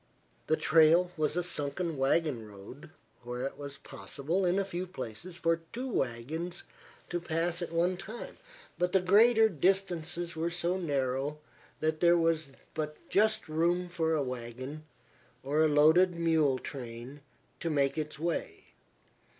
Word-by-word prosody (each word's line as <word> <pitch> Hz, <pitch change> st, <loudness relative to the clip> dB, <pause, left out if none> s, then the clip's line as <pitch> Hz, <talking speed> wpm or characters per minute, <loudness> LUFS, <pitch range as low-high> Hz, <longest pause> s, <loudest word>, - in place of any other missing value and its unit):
The 155 Hz, -, +3 dB
trail 165 Hz, +3 st, +5 dB
was 155 Hz, -1 st, 0 dB
a 180 Hz, -, +1 dB
sunken 170 Hz, 0 st, -3 dB
wagon 135 Hz, -3 st, +1 dB
road, 105 Hz, +11 st, -12 dB, 0.3 s
where 125 Hz, +1 st, -5 dB
it 135 Hz, -, -3 dB
was 140 Hz, -1 st, -8 dB
possible, 170 Hz, +7 st, -3 dB
in 175 Hz, +2 st, +2 dB
a 200 Hz, -, +1 dB
few 185 Hz, -1 st, -4 dB
places, 165 Hz, -, -7 dB
for 165 Hz, -1 st, +1 dB
two 250 Hz, +3 st, -4 dB
wagons 160 Hz, -, -3 dB, 0.5 s
to 175 Hz, -, -1 dB
pass 170 Hz, +1 st, -1 dB
at 170 Hz, -, -4 dB
one 175 Hz, +2 st, +1 dB
time, 220 Hz, +6 st, -8 dB, 0.4 s
but 180 Hz, 0 st, +1 dB
the 190 Hz, -, +6 dB
greater 220 Hz, +5 st, +6 dB
distances 175 Hz, -2 st, 0 dB
were 165 Hz, +1 st, -1 dB
so 175 Hz, +1 st, 0 dB
narrow 140 Hz, -3 st, -1 dB, 0.4 s
that 155 Hz, 0 st, 0 dB
there 175 Hz, 0 st, +5 dB
was 165 Hz, -2 st, +1 dB, 0.3 s
but 150 Hz, -1 st, -3 dB
just 215 Hz, +2 st, +2 dB
room 170 Hz, +3 st, +1 dB
for 160 Hz, -2 st, 0 dB
a 150 Hz, -, +1 dB
wagon, 130 Hz, +4 st, -6 dB, 0.6 s
or 145 Hz, +3 st, +1 dB
a 160 Hz, -, +6 dB
loaded 160 Hz, +5 st, +5 dB
mule 160 Hz, -5 st, +2 dB
train, 125 Hz, +1 st, -8 dB, 0.4 s
to 170 Hz, -, -2 dB
make 140 Hz, -3 st, +2 dB
its 150 Hz, -2 st, -4 dB
way. 170 Hz, +2 st, -3 dB
160 Hz, 150 wpm, -31 LUFS, 140-175 Hz, 0.6 s, the